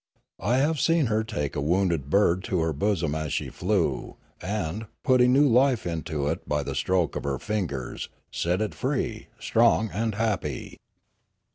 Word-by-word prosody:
I 120 +5 +1
have 150 +3 +2
seen 165 0 +3
her 110 +1 +2
take 75 - -3
a 70 - -1
wounded 85 -2 +1
bird 95 +1 +3
to 90 - 0
her 80 -1 0
bosom 85 -2 0
as 80 -2 -3
she - - -2
flew, 95 -1 -1 0.2
and, 100 +2 -3 0.2
putting 125 -3 +5
new 145 +3 +5
life 125 -1 +3
into 80 -4 -2
it - - -3
by 75 -1 +1
the - - -4
stroke 90 -3 0
of - - -3
her 70 -2 -1
fingers, 80 - -3 0.2
set 90 +4 0
it 110 - -1
free, 125 -5 -2
strong 115 -2 +3
and 110 0 -1
happy. 100 - -2
100 Hz, 165 wpm, -26 LUFS, 80-115 Hz, 0.2 s, putting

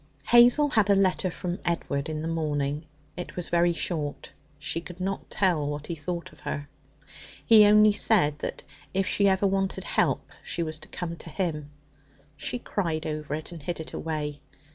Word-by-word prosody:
Hazel 245 +5 +7
had 215 -3 +3
a 200 - +6
letter 190 -1 +2
from 180 0 -4
Edward 155 -3 -1
in 155 0 -3
the - - -2
morning; 150 -2 -1 0.3
it 180 - -7
was 180 - -4
very 175 0 +3
short. 160 -3 -3 0.3
She 160 +3 -3
could 180 +1 -11
not 195 +1 -3
tell 170 -7 +1
what 145 0 -4
he 170 - -4
thought 170 +2 -5
of - - -19
her. 145 0 -4 0.8
He 215 -3 +8
only 210 0 +6
said 150 -9 +3
that - - -4 0.3
if 195 0 +2
she 200 +1 +2
ever 190 +1 +2
wanted 195 0 0
help - - 0
she 170 - -2
was 155 -1 -3
to 155 - -9
come 170 -1 -5
to 165 - -10
him. 150 -3 -2 0.7
She - - -3
cried 170 -9 -2
over 150 -1 -3
it, 155 +2 -7
and 170 -3 -8
hid 170 +4 -4
it 160 - -8
away. 150 -2 -3
170 Hz, 185 wpm, -27 LUFS, 150-195 Hz, 0.8 s, He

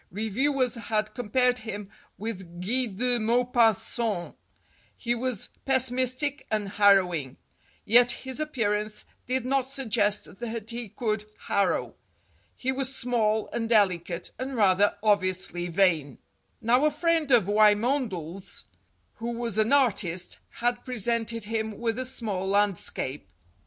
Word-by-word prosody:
Reviewers 250 - 0
had 220 -2 -2
compared 250 +1 +1
him 210 -3 -6 0.3
with 190 -6 -6
Guy 245 +8 0
de 240 +4 0
Maupassant. 230 -4 +1 0.6
He 240 -1 -1
was 240 -3 -3
pessimistic 260 +2 +1
and 210 -2 -1
harrowing. 180 -9 +3 0.5
Yet 240 +3 +6
his 260 +1 -6
appearance 215 -8 -1 0.2
did 255 -1 0
not 265 0 0
suggest 220 -8 0
that 230 -2 -5
he 235 -2 -5
could 215 -1 -2 0.2
harrow. 200 - 0 0.6
He 260 - -1
was 270 0 -2
small 220 -4 0
and 230 -1 -2
delicate, 180 -5 +1
and 260 +1 -4
rather 200 0 +3
obviously 185 -4 +1
vain. 165 -6 +1 0.4
Now 245 +5 +3
a - - +5
friend 320 0 +1
of 235 -8 +5
Wymondel's, 210 - +1 0.5
who 230 +1 -4
was 230 -3 -2
an 215 +3 +2
artist, 195 -10 +1
had 240 0 -2
presented 230 -1 -1
him 220 0 -3
with 230 0 -2
a 255 - -2
small 210 -7 -3
landscape. 195 - 0
225 Hz, 120 wpm, -27 LUFS, 200-250 Hz, 0.6 s, Yet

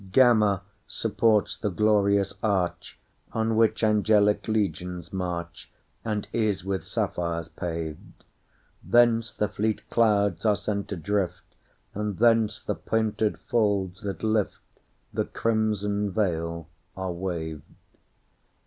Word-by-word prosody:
Gamma 105 -5 +4 0.2
supports 110 -1 +1
the 105 - -2
glorious 100 -1 +2
archOn 110 +3 -2
which 110 0 +2
angelic 105 -1 +3
legions 90 -6 -2
march, 90 -2 -4 0.3
And 105 -2 -2
is 105 -5 0
with 95 -3 -2
sapphires 85 -2 -2
paved; 80 -3 -6 0.6
Thence 115 +3 +4
the 105 - -1
fleet 105 +1 -2
clouds 100 -6 +2
are 105 -2 +4
sent 100 0 -3
adrift, 95 0 -2 0.4
And 105 -2 -3
thence 115 -2 +3
the - - -3
painted 110 -1 0
folds 100 -4 0
that 100 -2 -5
liftThe 110 -2 -3
crimson 105 -2 0
veil, 85 -5 -1 0.3
are 95 -1 -2
waved. 85 -4 -4
100 Hz, 105 wpm, -26 LUFS, 90-110 Hz, 0.6 s, Gamma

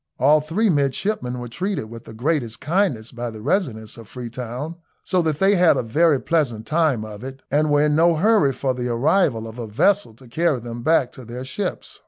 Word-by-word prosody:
All 150 +3 +4
three 170 +9 0
midshipmen 140 -3 0
were 120 0 -6
treated 180 - -3
with 115 0 -10
the - - -10
greatest 125 -2 -1
kindness 155 - 0
by 120 0 -5
the 110 -1 -9
residents 120 - -2
at 115 - -12
Freetown, 125 +6 -6 0.3
so 185 -1 +1
that 160 -3 -1
they 195 +4 +4
had 175 -2 +4
a - - 0
very 150 +5 +3
pleasant 125 -11 -1
time 150 -5 +1
of 105 +1 -9
it, 135 0 -8
and 150 +2 +2
were 145 0 +3
in 150 - +2
no 165 +1 +4
hurry 185 -4 +3
for 130 0 -1
the 125 -1 -3
arrival 120 - +1
of 115 +2 -10
a 115 - -4
vessel 125 - +1
to 130 +2 -17
carry 155 +2 0
them 120 0 -7
back 130 -2 +2
to 130 - -12
their 120 +2 -7
ships. 185 +7 -5
135 Hz, 210 wpm, -22 LUFS, 120-165 Hz, 0.3 s, All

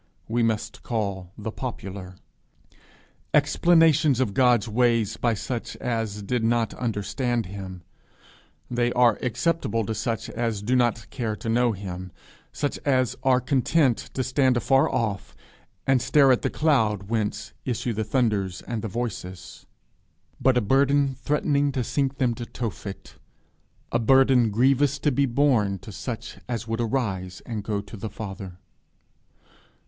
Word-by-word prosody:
we 120 +2 0
must 110 -2 -1
call 100 -6 -3
the 110 +1 -5
popular: 95 -7 -6 1.2
explanations 155 -2 +4
of 120 -6 0
God's 120 -2 +3
ways 115 -1 +2
by 115 0 +1
such 120 +3 -4
as 110 -4 -3
did 120 +3 -1
not 115 0 +1
understand 120 +1 -1
Him, 95 -1 -8 0.8
they 120 0 0
are 120 -3 +4
acceptable 125 -2 0
to 110 - -2
such 115 +1 -2
as 115 -4 -2
do 125 +5 +1
not 120 -2 +1
care 115 -5 -2
to 110 - -8
know 120 +1 +3
him, 95 -2 -7 0.4
such 145 - -2
as 130 -4 +2
are 130 -2 +4
content 130 0 +2 0.2
to 130 - 0
stand 130 -1 +2
afar 135 +3 +3
off 110 -5 -2 0.5
and 135 -2 +3
stare 140 +1 +5
at 125 - +3
the - - 0
cloud 110 -10 +2
whence 105 0 -2
issue 120 -1 -2
the 110 +1 -1
thunders 105 -5 0
and 115 -2 -4
the 110 - -3
voices; 95 -4 -6 0.7
but 130 -1 +3
a - - +3
burden 140 +4 +3
threatening 145 +1 +1
to 130 - -1
sink 135 +2 -1
them 125 -3 +1
to 120 0 -6
Tophet, 105 -4 -6 0.7
a - - +2
burden 130 -1 +5
grievous 135 +5 +3
to 150 - +1
be 140 +2 +2
borne, 115 -7 +2
to 105 - -11
such 115 +3 -6
as 115 -2 -3
would 115 +1 -1
arise 100 -7 -2
and 110 -4 -4
go 105 -1 -2
to 105 +3 -11
the 110 +1 -5
Father. 95 -3 -7
120 Hz, 145 wpm, -25 LUFS, 105-130 Hz, 1.2 s, stare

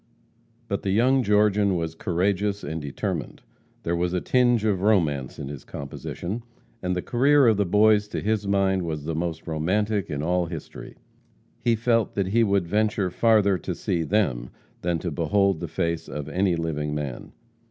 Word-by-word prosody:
But 100 - -2
the 100 - -2
young 125 +7 +3
Georgian 105 -2 +3
was 80 -2 -2
courageous 100 +4 -1
and 80 +2 -4
determined. 70 -1 -4 0.4
There 85 - 0
was 90 +1 -1
a 90 - +1
tinge 120 0 +2
of 100 -4 +1
romance 80 -11 +1
in 70 - -6
his 70 -1 -7
composition, 85 - -6 0.4
and 90 -1 -1
the 90 - -2
career 140 +3 +4
of 110 -3 +4
the 100 -2 +1
Boys, 105 +2 +4
to - - -4
his 105 -1 -1
mind, 95 -1 +2
was 80 -4 -4
the 80 - -2
most 80 0 -3
romantic 100 +6 0
in 75 -1 -3
all 90 +1 +1
history. 80 -3 -8 0.6
He 120 -1 +2
felt 115 0 +1
that 95 -2 0
he 115 +3 +3
would 100 -4 +2
venture 105 -1 +1
farther 105 -2 +3
to 90 - -4
see 90 -3 -1
them 75 - 0 0.3
than 85 -1 0
to 85 +1 -4
behold 95 +3 +1
the 85 - -4
face 85 0 -2
of 75 -1 -6
any 90 +2 +1
living 75 -3 -2
man. 70 -5 -5
95 Hz, 175 wpm, -25 LUFS, 80-105 Hz, 0.6 s, career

